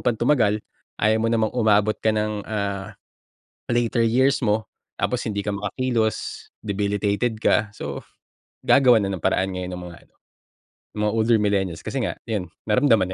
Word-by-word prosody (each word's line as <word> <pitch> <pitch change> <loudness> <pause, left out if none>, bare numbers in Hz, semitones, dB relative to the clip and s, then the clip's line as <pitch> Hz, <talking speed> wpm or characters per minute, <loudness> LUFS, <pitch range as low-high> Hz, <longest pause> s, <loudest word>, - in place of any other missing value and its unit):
pang 120 -2 +2
tumagal. 110 -4 +2 0.4
Ayaw 110 +1 +3
mo 115 - +1
namang 110 -2 +1
umabot 110 -3 +3
ka 110 - +1
ng, 105 -1 -2
ah, 100 -1 -3 0.8
later 120 0 +1
years 130 +4 +3
mo 110 -2 +1 0.3
tapos 125 - 0
hindi 100 -1 -3
ka 105 - -1
makakilos, 110 +2 -2 0.2
debilitated 105 +2 0
ka, 110 0 +2
so 70 -9 -6 0.6
gagawa 125 -5 +5
na 100 - -1
ng 95 - -4
paraan 95 +4 +1
ngayon 90 -1 -4
ang 90 - -7
mga 85 - -11
ano, - - -40 0.8
mga 105 0 -1
older 115 0 +3
millennials 95 -5 0
kasi - - -3
nga - - -3
yun, 100 -7 -3 0.2
naramdaman 110 -4 +3
105 Hz, 155 wpm, -23 LUFS, 100-115 Hz, 0.8 s, gagawa